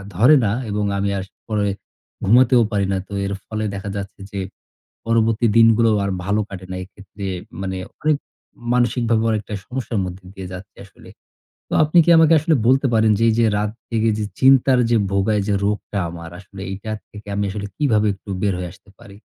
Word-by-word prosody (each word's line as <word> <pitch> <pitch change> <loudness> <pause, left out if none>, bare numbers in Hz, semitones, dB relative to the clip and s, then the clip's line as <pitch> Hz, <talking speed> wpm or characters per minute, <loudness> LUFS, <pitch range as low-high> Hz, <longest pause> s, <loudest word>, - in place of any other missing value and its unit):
ধরে 125 - +6
না। 100 - +1 0.2
এবং 105 0 -1
আমি 100 0 0
আর 95 - -3 0.2
পরে 105 -2 0 0.6
ঘুমাতেও 125 +4 +5
পারি 100 -2 +1
না। - - 0
তো 100 - -10
এর 100 - -2
ফলে 110 0 -3
দেখা 100 +1 -5
যাচ্ছে, 100 -1 -6
যে 100 - -4 0.7
পরবর্তী 115 0 +2
দিনগুলোও 115 -1 +5
আর 100 - -1
ভালো 105 +2 +1
কাটে 95 -1 -8
না। - - -4
এক্ষেত্রে 100 +1 -11 0.4
মানে 95 -1 -3 0.3
অনেক 155 -2 +3 0.6
মানসিকভাবেও 115 -2 +1
একটা 105 +1 -9
সমস্যার 125 -4 -3
মধ্যে 90 +1 -8
দিয়ে 95 -2 -7
যাচ্ছি 95 +2 -10
আসলে। 95 - -17 0.6
তো, - - -5
আপনি 155 +3 +1
কি - - +2
আমাকে 160 0 +6
আসলে 155 +1 +2
বলতে 135 +2 +4
পারেন, 110 -1 +4
যে 115 - +2
এইযে 115 +1 +2
রাত 105 0 -1 0.2
জেগে 115 -1 +1
যে 105 - -1
চিন্তার 130 -1 +5
যে 115 - +5
ভোগায়, 100 +1 +1
যে 105 - +1
রোগটা 105 0 -2
আমার 85 -1 -8
আসলে, 100 0 -12
এইটার 110 +3 -5
থেকে 105 0 -12
আমি 100 - 0
আসলে 100 0 -5
কিভাবে 110 -7 +2
একটু 100 +1 -14
বের 100 -2 +1
হয়ে 90 - -4
আসতে - - -21
পারি? 100 -1 -14
105 Hz, 185 wpm, -20 LUFS, 100-115 Hz, 0.7 s, ধরে